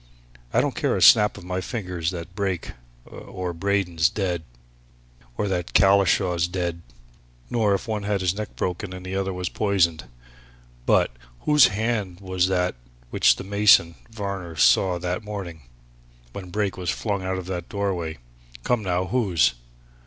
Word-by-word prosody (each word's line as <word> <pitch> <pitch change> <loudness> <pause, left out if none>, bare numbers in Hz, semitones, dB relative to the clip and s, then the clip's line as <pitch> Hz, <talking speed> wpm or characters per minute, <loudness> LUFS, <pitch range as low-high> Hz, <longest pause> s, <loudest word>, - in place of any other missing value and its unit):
I - - +3
don't - - -1
care - - 0
a - - -3
snap 105 0 +7
of - - -10
my 90 +1 -3
fingers 90 -5 -3
that 85 0 -7
Brake, 95 -3 -2 0.3
or 90 -1 -6
Braden's 85 -3 +1
dead, 90 -5 -2 1.0
or 105 - 0
that 90 -3 -3
Collishaw's 95 -2 +4
dead, 85 -2 -3 0.7
nor 110 -4 +2
if 100 - -5
one 110 -2 -2
had 100 -1 -1
his 90 -1 +1
neck 105 +1 -6
broken 90 +1 -3
and 90 0 -9
the 95 +1 -4
other 95 0 -1
was 90 -1 -3
poisoned, 90 -7 +1 0.8
but - - +3 0.3
whose 150 -2 +6
hand 105 -4 -2
was 95 -2 0
that 90 -1 0 0.4
which - - +4
the - - -7
mason, 100 -3 +4 0.2
Varner, 100 -6 -5
saw 90 +3 +4
that 90 +3 -3
morning, 85 -10 -7 0.6
when 95 -2 -8
Brake 100 0 -2
was 90 -2 -3
flung 100 0 -2
out 95 0 -2
of 95 - -6
that 90 -2 -5
doorway? 95 -6 -2 0.5
Come, 120 -2 +1
now! 90 -2 -1
whose?" 95 - +2
95 Hz, 155 wpm, -24 LUFS, 90-100 Hz, 1.0 s, snap